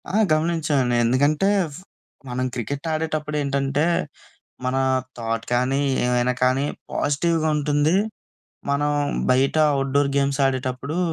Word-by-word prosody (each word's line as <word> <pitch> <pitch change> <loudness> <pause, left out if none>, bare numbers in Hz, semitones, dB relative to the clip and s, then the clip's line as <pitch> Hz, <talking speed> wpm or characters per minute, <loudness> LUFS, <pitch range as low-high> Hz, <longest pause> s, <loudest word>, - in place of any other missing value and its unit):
ఆ! - - -6 0.2
గమనించానండి 155 -6 +1
ఎందుకంటే, 145 +9 +2 0.2
ఫ్ 140 - -9 0.5
మనం 125 +1 -2
క్రికెట్ 140 +6 -4
ఆడేటప్పుడేంటంటే, 150 -2 -1 0.8
మనా 130 +1 +1 0.4
థాట్ 115 -1 -3
కానీ, 130 +3 +1 0.2
ఏమైనా 125 0 +1
కానీ, 130 +2 +2 0.3
పాజిటివ్‌గ 160 +3 0
ఉంటుంది. 150 +2 +1 0.8
మనం 145 +1 +1 0.4
బయట 130 +4 +2 0.2
అవుట్‌డోర్ 140 +1 +1
గేమ్స్ 140 0 0
ఆడేటప్పుడు, 130 +4 -2
140 Hz, 100 wpm, -23 LUFS, 130-150 Hz, 0.8 s, ఎందుకంటే